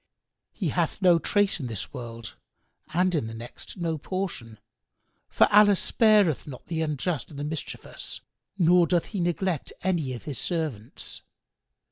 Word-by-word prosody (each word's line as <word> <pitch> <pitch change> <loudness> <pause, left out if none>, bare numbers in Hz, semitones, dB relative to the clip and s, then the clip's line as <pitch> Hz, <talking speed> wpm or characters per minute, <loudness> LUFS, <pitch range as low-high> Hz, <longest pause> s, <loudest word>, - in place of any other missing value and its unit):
He - - -2
hath - - 0
no 180 -3 +5
trace 205 +1 +2
in 130 - -3
this 110 -4 -5
world 115 -2 -7 0.6
and 180 +3 +2
in 145 -9 0
the 115 - -7
next 115 +10 -9
no 165 -3 -1
portion: 160 - -4 0.7
for - - +5
Allah 205 -1 +8
spareth 205 - +3
not 130 -4 -9
the 165 -1 -2
unjust 155 -1 -1
and 145 - -10
the - - -2
mischievous, 150 0 -5 0.4
nor 175 -1 +5
doth 175 -1 +2
He 200 - -1
neglect 175 -2 -1
any 170 -8 0
of 120 - -7
His 145 -5 -5
servants. 155 - -3
165 Hz, 150 wpm, -27 LUFS, 130-185 Hz, 0.7 s, Allah